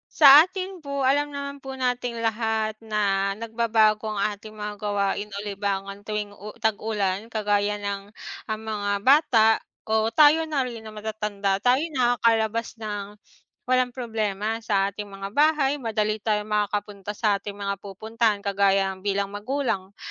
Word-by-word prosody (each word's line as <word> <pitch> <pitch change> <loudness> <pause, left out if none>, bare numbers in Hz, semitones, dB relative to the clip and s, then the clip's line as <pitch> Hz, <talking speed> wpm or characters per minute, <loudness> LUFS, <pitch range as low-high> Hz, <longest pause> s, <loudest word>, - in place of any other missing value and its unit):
Sa 290 0 +10
akin 370 -2 -7
po 280 0 -3
alam 290 +2 +1
naman 280 0 -5
po 270 - -5
nating 245 -2 -2
lahat 220 -1 -1
na 200 -2 +1
nagbabago 220 -1 +1
ang 200 - -3
ating 210 +1 -3
mga 210 -1 -6
gawain 205 0 -2
o - - -6
libangan 200 0 -4
tuwing 210 -1 -4
u 210 +2 -9
tag-ulan. 215 -1 -1
Kagaya 205 -1 0
ng 200 0 -5 0.3
ang 220 0 -4
mga 210 -2 -3
bata 255 -3 +5 0.4
o 220 +1 +1
tayo 305 +4 +6
na 280 -5 -1
rin 230 -2 -8
na 215 - -9
matatanda, 210 -2 -2
tayo 250 +2 +4 0.2
nakakalabas 230 -2 +1
nang 205 -2 -6 0.5
walang 255 0 +2
problema 225 -3 -3
sa 200 -3 0
ating 205 +1 -7
mga 195 0 -7
bahay. 290 -1 +2
Madali 215 -2 -1
tayo 210 -1 0
makakapunta 205 -1 -2
sa 205 -2 +1
ating 200 0 -7
mga 200 -1 -3
pupuntahan. 215 +1 -1
Kagaya 195 -1 +2
bilang 200 0 -1
magulang, 205 -4 -3
215 Hz, 145 wpm, -25 LUFS, 205-235 Hz, 0.5 s, Sa